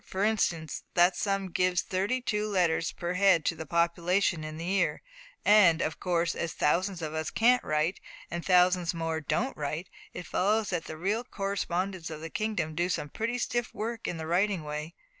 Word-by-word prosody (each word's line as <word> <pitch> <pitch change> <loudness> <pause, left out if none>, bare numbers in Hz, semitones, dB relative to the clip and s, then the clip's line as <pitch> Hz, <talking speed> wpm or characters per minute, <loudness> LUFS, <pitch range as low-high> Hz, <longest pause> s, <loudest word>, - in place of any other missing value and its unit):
For 190 +1 -3
instance, 175 -8 0
that 175 +1 +5
sum 195 -1 -1
gives 180 0 +1
thirty 200 +8 -1
two 215 -3 -1
letters 175 -5 +1
per 175 0 -4
head 185 -4 +4
to - - +1
the 160 -1 -7
population 170 +1 +1
in 155 0 -6
the 165 - -5
year; 195 +2 0 0.4
and, 195 -6 +6
of 155 -2 -2
course, 170 -1 0
as 170 - -3
thousands 175 +3 0
of 155 -1 -4
us 155 0 -2
can't 245 +2 +3
write, 155 +4 0 0.3
and 170 0 -3
thousands 180 -1 +3
more 165 -1 -2
don't 250 - -1
write, 155 +4 -4 0.2
it 180 - -7
follows 210 +3 +1
that 175 -3 -2
the 160 - -7
real 205 +8 -1
correspondents 195 -5 -3
of 155 -1 -6
the 165 0 -7
kingdom 215 -8 -2
do 175 +3 0
some 150 -4 -2
pretty 230 - -2
stiff 240 -1 -2
work 230 +2 -4
in 175 - -3
the 160 - -5
writing 180 +1 +1
way. 150 +2 -5
180 Hz, 190 wpm, -29 LUFS, 165-200 Hz, 0.4 s, and